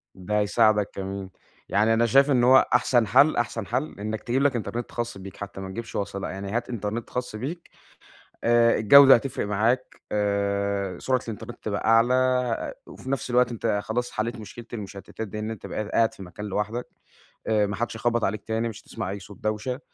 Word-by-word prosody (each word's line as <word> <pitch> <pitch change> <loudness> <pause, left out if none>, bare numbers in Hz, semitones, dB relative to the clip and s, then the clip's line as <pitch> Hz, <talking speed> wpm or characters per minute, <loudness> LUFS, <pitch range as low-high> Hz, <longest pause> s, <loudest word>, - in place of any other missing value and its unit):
ده 105 +3 -1
هيساعدك 105 0 +3
كمان، 95 0 -5 0.4
يعني 105 +3 +3
أنا 115 +1 +3
شايف 135 +5 +4
إن 125 -3 +3
هو 130 +2 +6
أحسن 120 -2 +3
حل 135 +8 +5
أحسن 120 -2 -1
حل 130 0 -3
إنّك 110 +1 -4
تجيب 125 +3 0
لك 145 -3 +3
إنترنت 120 +1 -4
خاص 120 -3 -4
بيك 95 0 -10
حتّى 100 -1 -7
ما 95 - -6
تجيبش 115 +4 -7
وصلة 100 -1 -3
بقى، - - -4
يعني 100 +1 -6
هات 120 +2 -2
إنترنت 110 0 -4
خاص 125 -3 -4
بيك، 150 +10 -6 0.7
آآ 115 0 +4
الجودة 135 +5 +8
هتفرق 120 -3 -2
معاك، 115 +5 0
آآ 100 -1 -1
سرعة 130 -1 +1
الإنترنت 110 -3 -7
تبقى - - -2
أعلى 125 +1 +2
وفي 130 - -10
نفْس 135 -1 -2
الوقت 125 0 +3
أنت 110 -2 -1
خلاص 120 +2 -2
حليت 115 +2 -2
مشكلة 115 +2 -10
المشتتات 105 0 -7
دي 105 +2 -6
إن 110 +1 -3
أنت 110 - -8
بقيت 110 - -4
قاعد 115 -1 +2
في 100 - -10
مكان 95 +3 -8
لوحدك، 105 +4 -3 0.6
آآ 110 -2 +3
ما 100 - -3
حدش 115 0 -3
هيخبط 120 0 0
عليك 105 +2 -1
تاني، 115 +1 -1
مش 110 -1 -9
هتسمع 90 - -5
أي 100 +1 -4
صوت 100 +1 -12
دوشة، 110 +4 -2
110 Hz, 195 wpm, -25 LUFS, 100-120 Hz, 0.7 s, الجودة